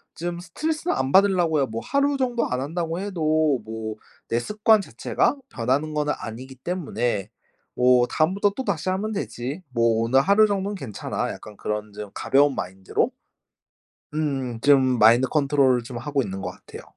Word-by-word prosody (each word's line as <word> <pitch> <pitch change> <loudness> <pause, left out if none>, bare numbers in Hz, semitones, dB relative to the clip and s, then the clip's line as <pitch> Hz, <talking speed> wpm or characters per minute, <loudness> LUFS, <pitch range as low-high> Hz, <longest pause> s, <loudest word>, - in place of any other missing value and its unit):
좀 175 +1 -4
스트레스는 310 - -2
안 130 0 -1
받으려고요. 175 -7 +4
뭐 115 0 -5
하루 280 0 +1
정도 245 -3 0
안 125 0 -1
한다고 165 +4 -3
해도 155 -7 +1
뭐 110 -1 -5 0.3
내 115 - +1
습관 210 - +3
자체가 240 +5 0
변하는 135 +6 -1
거는 150 0 +1
아니기 125 +4 -8
때문에 120 - -2 0.5
뭐 125 0 +5
'다음부터 190 +8 +1
또다시 200 - -3
하면 195 +4 -1
되지. 145 - -4
뭐 115 -2 +2
오늘 130 +4 +4
하루 200 +7 +5
정도는 200 0 -2
괜찮아.' 130 - -4
약간 105 -1 -10
그런 105 0 -4
좀 105 0 -7
가벼운 140 0 +3
마인드로 95 +1 -2 1.0
음음, 135 -6 -2
좀 130 -3 +4
마인드 115 +4 +6
컨트롤을 140 -4 +2
좀 120 +1 -7
하고 140 +3 -1
있는 95 -4 -5
것 - - -3
같아요. - - -12
140 Hz, 335 characters per minute, -24 LUFS, 120-185 Hz, 1.0 s, 마인드